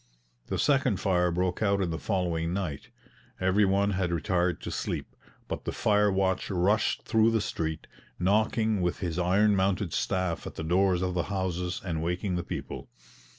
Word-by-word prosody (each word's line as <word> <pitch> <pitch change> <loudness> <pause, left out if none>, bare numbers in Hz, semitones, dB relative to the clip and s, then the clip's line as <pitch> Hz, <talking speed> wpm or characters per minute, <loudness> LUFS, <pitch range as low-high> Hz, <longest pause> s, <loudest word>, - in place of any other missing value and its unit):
The - - -2
second 135 -8 +2
fire 90 -2 +2
broke 90 +2 -1
out 100 -2 +2
in 90 -3 0
the 80 - -3
following 85 -4 -1
night. 85 -8 -4 0.5
Every 95 +3 +3
one 100 +1 +2
had 90 -2 -1
retired 85 +2 0
to - - -5
sleep, - - -4 0.3
but - - -4
the - - -3
fire 105 -1 +2
watch 95 -1 0
rushed 100 +3 +1
through 110 0 +3
the 115 0 +2
street, 80 -5 -3 0.3
knocking 110 +2 +2
with 90 -1 0
his 90 -3 -3
iron 100 +4 +3
mounted 95 -2 0
staff 95 -3 -1
at - - -8
the - - -5
doors 90 +2 +2
of 90 -1 -1
the 90 -1 -1
houses 90 -2 -2
and 80 -4 -2
waking 90 +3 -1
the 90 - -2
people. - - -6
95 Hz, 175 wpm, -28 LUFS, 90-100 Hz, 0.5 s, Every